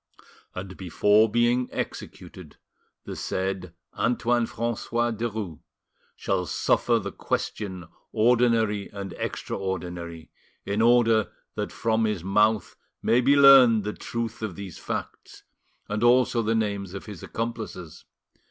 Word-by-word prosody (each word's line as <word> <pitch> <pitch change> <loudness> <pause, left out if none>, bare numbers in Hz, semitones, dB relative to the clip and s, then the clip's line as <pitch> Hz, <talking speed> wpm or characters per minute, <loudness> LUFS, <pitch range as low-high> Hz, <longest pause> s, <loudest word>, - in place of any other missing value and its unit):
And, 95 0 -7
before 105 +4 +3
being 120 +3 +2
executed, - - -7 0.5
the - - -7
said 95 -2 -3 0.2
Antoine 120 -1 +1
Francois 120 +1 -1
Derues 110 -7 -4 0.6
shall - - -1
suffer 120 -1 +2
the 100 -2 -4
question 95 -3 -3 0.3
ordinary 115 -3 +2
and 100 -2 -6
extraordinary, 85 -3 -5 0.3
in 100 +2 -1
order 115 -3 +4 0.2
that - - -4
from 115 0 0
his 105 -6 -2
mouth 105 +2 +2 0.3
may 120 +2 +4
be 140 +3 +4
learned 135 -6 +8
the 105 +1 -3
truth 115 -1 -5
of 105 -5 -4
these 100 -3 -8
facts, - - -6 0.4
and 105 +1 -2
also 120 0 +4
the 115 +1 0
names 100 -3 -2
of 100 - -7
his 105 -5 -9
accomplices. 110 -7 -6
110 Hz, 120 wpm, -26 LUFS, 95-115 Hz, 0.6 s, learned